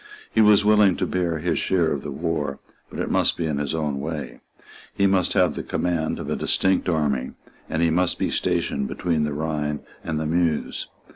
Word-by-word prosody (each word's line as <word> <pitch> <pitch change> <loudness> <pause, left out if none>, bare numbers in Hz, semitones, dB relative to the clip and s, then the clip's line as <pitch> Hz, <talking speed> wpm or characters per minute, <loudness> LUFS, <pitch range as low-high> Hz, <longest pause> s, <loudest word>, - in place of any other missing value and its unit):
He 110 - +4
was 105 -1 +6
willing 105 -3 +5
to - - -1
bear 85 -3 -1
his 85 +3 -1
share 85 -4 +1
of 70 - -2
the 75 - -6
war; 75 -1 -2 0.3
but - - -9
it - - -2
must - - +2
be 85 - -1
in 75 -3 -1
his 75 +1 -2
own 75 -3 -1
way; 75 0 -5 0.6
he 100 - +2
must 95 -2 +2
have - - +3
the - - -4
command 85 -3 -1
of - - -6
a - - -1
distinct 95 -1 +1
army; 70 -6 0 0.4
and 80 +1 0
he 85 - +3
must 90 +2 +1
be - - -1
stationed 70 -1 0
between 80 -2 0
the 75 - -2
Rhine 75 -1 -2 0.2
and 80 -1 -2
the 80 - -2
Meuse. 80 -1 0
80 Hz, 205 wpm, -24 LUFS, 75-90 Hz, 0.6 s, was